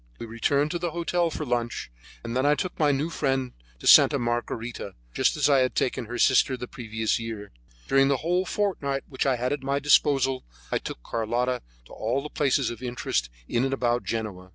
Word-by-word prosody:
We - - -6
returned 140 +6 0
to 175 - -2
the 175 0 -1
hotel 170 +1 0
for 155 -1 -4
lunch, 120 - -2 0.3
and 115 0 -4
then 130 - +2
I 145 +1 +4
took 180 +4 -4
my 150 -2 +4
new 145 +4 -1
friend 135 -4 -1 0.3
to - - -12
Santa - - +8
Margarita, 120 -3 -3 0.2
just 130 - +2
as 145 -2 +3
I 140 -2 +5
had 130 0 +1
taken 125 -1 0
her 120 +2 -5
sister 130 +1 +4
the - - -8
year - - -23
previously. 110 -3 -3 0.4
During 135 0 +4
the 140 -1 +2
whole 180 +2 +2
fortnight 145 -10 -1
which 135 0 -2
I 130 - +3
had 125 +3 -1
at 145 - -4
my 140 +1 0
disposal, 135 -2 +3 0.3
I - - +1
took - - -8
Carlotta 120 +3 -1 0.2
to - - -15
all 120 +5 -1
the 150 - -6
places 135 -5 +1
of 120 - -9
interest 120 - -2 0.2
in 120 - 0
and 135 0 0
about 120 -1 0
Genoa. 100 -5 -4
130 Hz, 205 wpm, -26 LUFS, 120-145 Hz, 0.4 s, Santa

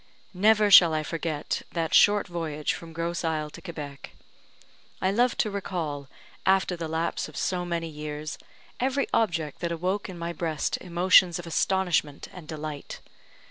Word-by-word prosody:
Never 210 +2 +4
shall 170 -5 +9
I 155 - 0
forget 160 -2 -3
that 165 -2 -2
short 205 0 +5
voyage 160 -4 -2
from 165 -1 -9
Grosse 170 +1 -3
Isle 155 -2 -1
to - - -11
Quebec. 145 - -8 0.9
I 190 - +1
love 240 +4 +2
to 215 - +1
recall, 165 -8 -4 0.4
after 190 -1 +2
the 165 -1 -4
lapse 160 +1 -2
of - - -11
so 180 -1 -1
many 170 -1 -2
years, 150 0 -6 0.4
every 270 +2 +1
object 165 -9 0
that 170 -1 -2
awoke 185 +5 -2
in 180 - -8
my 170 0 -4
breast 160 -2 -2
emotions 180 0 +4
of 175 - -7
astonishment 170 -3 0
and 175 -4 -11
delight. 155 -2 -6
170 Hz, 155 wpm, -27 LUFS, 155-185 Hz, 0.9 s, shall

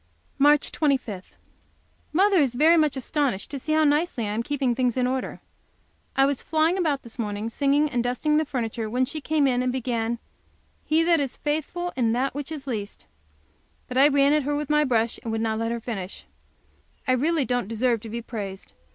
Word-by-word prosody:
March 290 +1 +4
25. 255 - -1 0.8
Mother 390 +4 +4
is 270 -7 +2
very 315 +6 +5
much 305 -4 +2
astonished 265 -5 -1
to 280 - -4
see 310 +4 -2
how 315 0 +4
nicely 295 -3 +1
I - - -2
am 220 - -1
keeping 270 -1 0
things 250 0 0
in 250 - +2
order. 255 0 -3 0.7
I 270 - +5
was 280 -1 -1
flying 320 +2 +1
about 315 -7 0
this 235 0 -11
morning, 210 0 -3
singing, 285 +3 +2
and 245 -5 -1
dusting 250 +5 +1
the 310 - +3
furniture, 230 -5 -3
when 250 +3 +1
she 310 +4 -6
came 310 -1 +1
in 250 -2 +2
and 255 0 0
began, 235 -2 -2 0.7
"He 315 +1 +2
that 335 -1 +3
is 275 -3 -3
faithful 315 +4 -2
in 230 -3 +1
that 260 +3 0
which 290 +2 -5
is 295 -4 -6
least" 215 -6 -5 0.8
but 250 - -7
I 270 +2 +7
ran 280 0 +4
at 300 - +3
her 290 +2 -1
my 300 +1 +3
brush, 235 -4 0
and 230 - -4
would 225 - -1
not 220 -1 -1
let 230 0 -1
her 235 - -2
finish. 200 -5 -6 0.8
I - - +3
really, 255 -1 +2
really 315 -2 +2
don't 245 -5 -1
deserve 230 +1 +1
to 225 - -8
be 235 +1 -5
praised. 200 -5 -7
260 Hz, 205 wpm, -25 LUFS, 235-300 Hz, 0.8 s, I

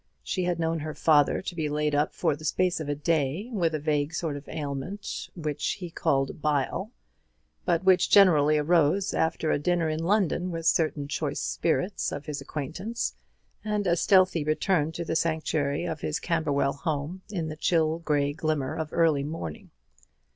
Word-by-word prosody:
She 185 -2 -2
had 175 -1 0
known 165 0 0
her 155 0 -5
father 150 +1 +3
to 190 - -4
be 155 -3 -1
laid 150 0 0
up 145 +1 +2
for - - 0
the 155 - -13
space 180 +3 +1
of 155 -2 -4
a 145 - 0
day 160 - -1
with 170 -6 +1
a - - -2
vague 150 +1 0
sort 160 -4 -2
of 140 0 -9
ailment 150 +7 -5
which 150 -4 -2
he 180 -3 -7
called 135 -1 0
"bile," 150 +7 0 0.8
but 175 0 +1
which 185 -1 +4
generally 155 -7 +6
arose 170 +5 +2
after 160 -1 0
a - - +1
dinner 170 +1 +1
in 155 0 -2
London 185 -1 +1
with 165 -2 -5
certain 155 -3 +1
choice 145 -1 -2
spirits 180 +4 -1
of 145 - -6
his 150 -2 -4
acquaintance, 165 - -4 0.5
and 210 -1 -1
a 170 -2 +3
stealthy 185 -3 +4
return 155 +1 +1
to 170 - -4
the - - -2
sanctuary 160 -2 0
of 160 -3 -4
his 150 - -2
Camberwell 145 -4 0
home 150 +5 -3
in 170 -6 -3
the 155 - -5
chill 160 0 +1
grey 145 -3 0
glimmer 155 -3 -1
of 160 -1 -3
early 160 -4 +3
morning. 145 - -6
160 Hz, 175 wpm, -27 LUFS, 145-175 Hz, 0.8 s, generally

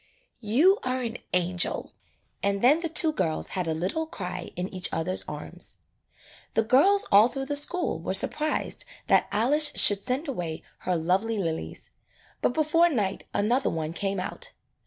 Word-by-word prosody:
"You 280 - +3
are 255 0 -2
an 235 0 -5
angel!" 180 0 0 0.5
And 200 +1 -1
then 285 +6 +5
the 335 -1 -3
two 325 -1 +5
girls 165 - -2
had 185 -3 -2
a 160 - -1
little 195 - -3
cry 180 - -6
in 180 +1 -3
each 185 -1 +2
other's 170 +3 0
arms. - - -6 0.8
The 225 - +3
girls 390 - +4
all 205 +3 +7
through 270 +1 -5
the 290 +1 -3
school 345 +5 +1
were - - -1
sur - - +6
prised 310 +10 -3 0.2
that - - +3
Alice 290 +8 +3
should 205 -1 +5
send 260 +9 -2
away 175 - -5 0.2
her 180 - +1
lovely 190 +7 0
lilies, 165 -5 -5 0.5
but - - +2
before 330 +2 +3
night 205 - -2
another 240 +6 +1
one 160 0 -4
came 195 +1 0
out. 185 - -6
225 Hz, 165 wpm, -26 LUFS, 185-295 Hz, 0.8 s, all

